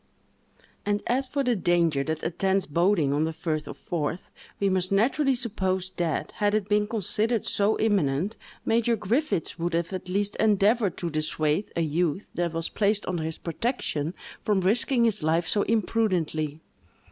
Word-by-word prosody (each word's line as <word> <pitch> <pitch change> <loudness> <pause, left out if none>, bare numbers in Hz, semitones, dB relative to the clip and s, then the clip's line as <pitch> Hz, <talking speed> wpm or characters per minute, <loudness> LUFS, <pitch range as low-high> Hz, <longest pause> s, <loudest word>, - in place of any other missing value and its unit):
And 205 0 0
as 260 +2 +1
for 280 +1 -1
the 245 -2 +2
danger 170 -6 +2
that 160 -1 -3
attends 190 +3 +1
boating 165 -2 +2
on 150 +2 +2
the 160 - -2
firth 160 -1 -3
of - - -7
Forth, 170 +1 -3 0.3
we 200 - +2
must 185 -1 0
naturally 260 +7 +3
suppose 190 -6 -1
that, 170 -3 -1
had 205 0 +2
it 210 -2 0
been 210 0 +2
considered 220 +1 +1
so 205 +2 +1
imminent, 195 -3 +1 0.3
Major 230 +1 +2
Griffiths 225 - -1
would 170 0 -1
have 170 +2 -1
at 185 -1 -5
least 200 +2 0
endeavored 210 -1 +3
to 170 -2 -3
dissuade 155 +3 -1
a 170 - +1
youth 165 +3 0
that 175 -1 -1
was 165 0 -2
placed 205 0 0
under 175 -3 -1
his 160 0 -3
protection 165 - -2 0.3
from 205 -3 +2
risking 235 +5 +2
his 215 -4 +1
life 165 +2 +1
so 205 - +2
imprudently. 175 -9 0
190 Hz, 165 wpm, -26 LUFS, 165-215 Hz, 0.3 s, naturally